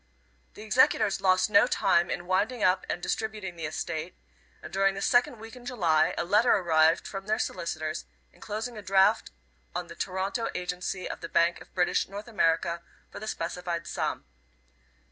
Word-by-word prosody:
The 210 - -9
executors 215 -3 +3
lost 185 -1 +4
no 205 -1 +5
time 170 0 +2
in 175 - -3
winding 210 +6 0
up 185 +1 +2
and 175 - -3
distributing 210 -5 -3
the 165 -2 -4
estate, 160 +2 -4 0.5
and - - -9
during 195 0 +2
the 195 - -5
second 245 +1 +3
week 225 +2 -11
in 250 - -12
July 175 -11 +2
a - - -1
letter 210 +7 +4
arrived 165 -4 +3
from 195 0 -7
their 215 +1 +1
solicitors 155 -2 -3 0.3
enclosing 220 +2 -5
a - - -7
draft 190 0 +3 0.5
on - - -4
the - - -9
Toronto 190 +5 -2
agency 180 +1 -3
of - - -6
the - - -6
Bank 170 0 +2
of - - -14
British 180 -1 +1
North 200 +3 -7
America 170 -5 +1 0.3
for - - -8
the 215 - -7
specified 170 -2 -3
sum. 70 - -3
190 Hz, 170 wpm, -28 LUFS, 170-215 Hz, 0.5 s, no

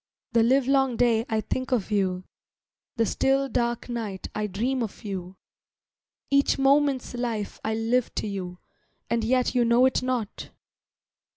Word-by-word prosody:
The 230 - +4
livelong 265 +1 +3
day 230 -2 +3
I 220 -1 +1
think 255 +4 -3
of 225 -4 0
you, 185 -3 0 0.7
The 230 -2 +2
still, 270 +6 +1
dark 240 -2 -1
night 225 -6 -5
I 210 0 -2
dream 240 +7 -1
of 225 +1 -5
you, 190 -2 -5 1.0
Each 280 0 +3
moment's 275 -1 +2
life 235 -4 -3
I 220 0 -1
live 230 +2 0
to - - -2
you, 185 -3 -5 0.5
And 235 -1 +1
yet 250 +2 +1
you 245 -2 +3
know 235 +2 +4
it 260 - +2
not. 250 -5 -3
235 Hz, 150 wpm, -26 LUFS, 215-255 Hz, 1.0 s, The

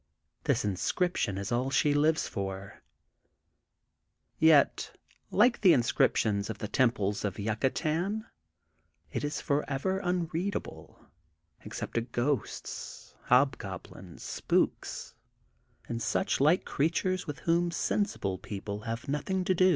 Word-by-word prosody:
This - - +2
inscription 100 - 0
is 100 +2 -4
all 125 +3 +1
she 145 +2 +3
lives 155 +2 +2
for. 95 0 -5 1.6
Yet, 160 -3 +4 0.3
like 240 +4 +4
the 185 -5 +7
inscriptions 110 -4 +2
of 110 - -4
the 105 - -4
temples 105 -5 +1
of 100 -3 -2
Yucatan, 155 - -1 0.9
it - - -3
is 145 +1 -2
forever 145 +6 0
unreadable 180 +1 -3 0.6
except - - -6
to 115 - +1
ghosts, 120 +1 -3
hobgoblins, 95 - 0
spooks, - - -1 0.7
and 115 0 -3
such - - 0
like 155 +6 +4
creatures, 180 +5 0
with 150 - -4
whom 170 +1 +2
sensible 170 - -1
people 100 +1 -5
have 115 +2 -5
nothing 165 +7 -1
to 185 - +3
do. 185 +1 +5
140 Hz, 110 wpm, -30 LUFS, 105-175 Hz, 1.6 s, the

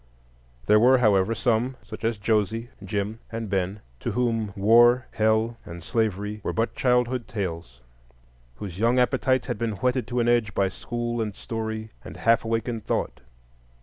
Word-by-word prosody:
There 105 +1 +5
were, 130 +4 +6
however, 110 -2 +3
some—such 120 -1 -2
as 115 -1 0
Josie, 110 +2 0
Jim, 100 +2 -3
and 115 -2 -5
Ben—to 95 - -3
whom 115 -4 0
War, 120 +5 +5
Hell, 110 +2 +1
and 85 0 -9
Slavery 105 -1 -1
were - - -2
but 115 +1 0
childhood 125 -1 +1
tales, 85 - -5 0.7
whose 95 +5 -7
young 120 +3 +3
appetites 130 +1 +2
had - - -4
been 115 -2 -1
whetted 125 +4 0
to 125 0 -1
an 120 - +1
edge 120 -4 +2
by 95 -1 +2
school 120 +3 -3
and 105 -3 -3
story 110 -1 -5
and - - -9
half 115 0 +3
awakened 115 0 -2
thought. - - -2
110 Hz, 150 wpm, -25 LUFS, 105-120 Hz, 0.7 s, were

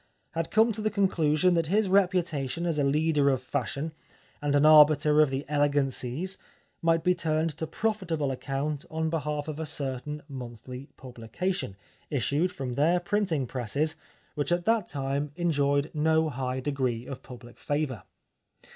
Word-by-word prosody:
— - - -45
had 165 0 -2
come 225 +2 +4
to 215 0 -4
the 215 - +1
conclusion 180 -4 +2
that 165 -2 +1
his 205 +4 +2
reputation 175 -6 +1
as 165 -3 0
a - - +3
leader 150 0 +3
of 135 -2 +2
fashion 140 +4 -3 0.5
and 145 -1 +1
an 145 +1 +4
arbiter 150 0 +7
of 150 - +4
the 135 +2 -3
elegancies 145 +3 0 0.4
might 165 0 +2
be 180 - +4
turned 160 -2 -1
to 160 +1 -4
pro 225 +7 0
fitable 165 -9 -2
account 140 +2 -3
on 160 0 -1
behalf 150 -2 -2
of 155 0 -5
a 160 - -2
certain 140 +2 -4
monthly 125 0 -8
publication, 125 - -4 0.3
issued 145 - +1
from 130 -5 -5
their 160 +7 +3
printing 175 -6 0
presses, 135 +6 -2 0.4
which 145 +3 -2
at 175 0 +1
that 225 -4 +2
time 140 0 -2
enjoyed 145 -4 +1
no 160 +1 +2
high 130 -1 -3
degree 130 -4 -1
of 135 0 -7
public 120 -2 -12
favour. 145 -7 -2
150 Hz, 160 wpm, -28 LUFS, 135-165 Hz, 0.5 s, arbiter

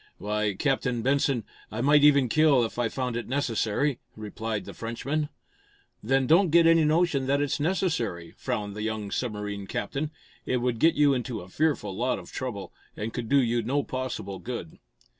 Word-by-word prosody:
"Why, 105 -1 -1
Captain 125 0 0
Benson, 135 -2 +2 0.3
I 110 - -3
might 145 +2 +5
even 140 -3 +6
kill, 140 -2 +4
if 115 - -6
I 120 -2 +1
found 125 -1 -3
it 120 - -3
necessary," 130 0 0 0.2
replied 110 0 -4
the - - -8
Frenchman. 140 +7 -3 0.7
"Then 135 +4 +2
don't 170 +7 +5
get 170 +1 +5
any 165 -1 +6
notion 155 -3 +2
that 140 +1 +2
it's 145 0 0
necessary," 145 - -1
frowned 100 -1 -3
the 105 - -5
young 110 -2 -3
submarine 105 -4 -3
captain. 140 +11 -3 0.3
"It 130 - 0
would 120 -2 -1
get 165 +5 +4
you 145 -1 +4
into 125 -2 -3
a 90 - -12
fearful 135 -7 0
lot 125 +4 0
of - - -11
trouble, 115 -7 -5 0.2
and 110 +2 -4
could 120 -3 -4
do 140 - +5
you 120 -2 +1
no 135 +6 0
possible 130 -7 -4
good." 115 -10 -6
125 Hz, 180 wpm, -27 LUFS, 110-145 Hz, 0.7 s, even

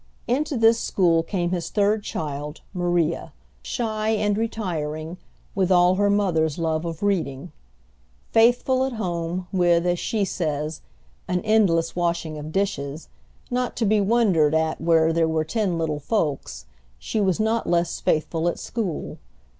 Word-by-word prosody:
Into 275 +3 0
this 225 0 +5
school 170 -4 +2
came 175 0 -2
his 175 -2 -2
third 210 +1 +2
child, 150 -5 -5
Maria, 175 -2 0 0.3
shy 220 -3 -2
and 210 -2 +1
retiring, 175 -7 -3 0.3
with 190 -1 +1
all 180 0 +5
her 205 +2 +2
mother's 170 -7 +1
love 160 -1 -1
of 165 +2 -5
reading. 170 -6 -1 0.8
Faithful 245 +3 +4
at 265 -1 -2
home, 175 -4 -3
with, 175 -2 +3
as 175 -1 +1
she 210 -3 0
says, 155 -3 -3 0.5
"an 180 0 0
endless 195 -7 +2
washing 170 -3 -1
of 150 +1 -7
dishes," 160 -6 -2 0.4
not 250 0 -1
to 230 - 0
be 210 0 +3
wondered 195 -8 +3
at 160 -1 0
where 165 -1 +3
there 165 0 +2
were 160 -1 0
ten 195 -1 -1
little 155 -3 -1
folks, 140 - -2 0.3
she 210 - -2
was 190 0 +1
not 220 +1 0
less 170 0 +1
faithful 160 +2 0
at 175 - 0
school. 210 -9 -4
175 Hz, 145 wpm, -24 LUFS, 160-210 Hz, 0.8 s, this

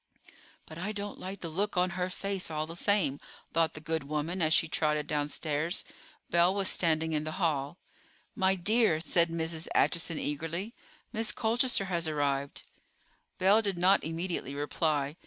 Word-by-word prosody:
"But 155 - -10
I 205 +4 -3
don't 205 -1 -5
like 190 +1 -6
the 170 - -4
look 195 +4 -1
on 180 0 +3
her 180 +1 -2
face, 195 -1 -4
all 155 -1 -2
the 165 +1 -9
same," 175 -7 +1 0.3
thought 165 0 +2
the - - -5
good 160 -2 -2
woman 155 +5 -2
as 155 -1 +2
she 165 - +4
trotted 150 -1 0
downstairs. 150 +3 -1 0.5
Belle 175 +3 +4
was 195 -1 +2
standing 160 -2 +1
in 150 -1 0
the 155 0 -4
hall. 155 -3 0 0.6
"My 190 -3 +3
dear," 205 -2 +3
said 170 +1 +2
Mrs. 165 -1 -1
Acheson 170 -2 +2
eagerly, 165 +9 -3 0.4
"Miss 225 -1 0
Colchester 235 -2 +2
has 170 -3 -1
arrived." 140 -2 -1 0.7
Belle 195 +4 +5
did 200 -4 0
not 185 +3 +4
immediately 165 -3 -3
reply. 145 0 -1
165 Hz, 160 wpm, -30 LUFS, 155-190 Hz, 0.7 s, Belle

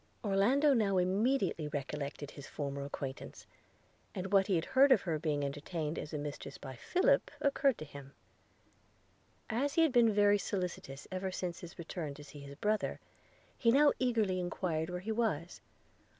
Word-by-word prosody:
Orlando 235 +9 +4
now 205 -6 +2
immediately 190 - +1
recollected 145 0 -4
his 140 -1 -10
former 140 -1 -4
acquaintance, 135 -1 -6 0.7
and 190 +2 -4
what 195 -1 +5
he 195 - +2
had 165 - 0
heard 275 +1 +5
of 235 -7 +6
her 160 -4 -1
being 145 -2 0
entertained 150 +2 -3
as 150 - -6
a 150 - -3
mistress 145 0 -6
by 135 -2 -8
Philip 360 - +2
occurred 275 -2 +2
to 155 - -7
him: 140 -1 -11 1.3
as 270 +6 -1
he 330 - +5
had 320 - +3
been 240 -3 +5
very 205 0 +4
solicitous 180 -9 -4
ever 185 0 -2
since 180 -2 -4
his 175 +1 -10
return 160 -4 -5
to 150 - -11
see 145 0 -11
his 140 0 -9
brother, 210 +6 0 0.6
he 230 - +2
now 285 +3 +6
eagerly 220 -7 +1
enquired 175 -2 -2
where 180 0 -4
he 220 +4 -3
was. 215 -8 -1
180 Hz, 165 wpm, -33 LUFS, 150-220 Hz, 1.3 s, of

